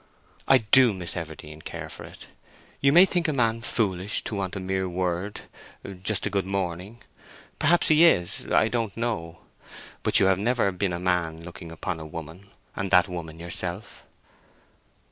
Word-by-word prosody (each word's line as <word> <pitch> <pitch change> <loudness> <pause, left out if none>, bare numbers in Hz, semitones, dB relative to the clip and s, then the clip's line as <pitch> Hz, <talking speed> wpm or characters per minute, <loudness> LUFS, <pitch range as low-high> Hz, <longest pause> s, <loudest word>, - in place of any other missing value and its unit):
I - - +7
do, 115 +2 +4
Miss 90 -3 -4
Everdene, 80 -2 -7
care - - -6
for - - -10
it. - - -13 0.5
You 140 - +4
may 175 +5 +8
think 175 -3 -1
a 155 - 0
man 115 -3 +1
foolish 105 -5 -1
to - - -5
want 95 -2 -3
a - - -3
mere 95 0 -2
word—just 95 +2 -5
a - - 0
good 95 -2 -1
morning. 95 +3 -4 0.6
Perhaps 175 0 +3
he 155 +1 +6
is—I 100 - +3
don't 115 -3 -2
know. 85 -9 -3 0.6
But - - +2
you 100 - +4
have 95 -1 +3
never 115 -2 +1
been 90 0 -1
a - - -2
man 85 -3 -1
looking 85 -1 -9
upon 85 +1 -4
a 80 - -7
woman, 85 +4 -9 0.3
and 100 0 -3
that 90 -1 +5
woman 85 -3 -7
yourself." 85 +4 -5
95 Hz, 165 wpm, -26 LUFS, 85-110 Hz, 0.6 s, may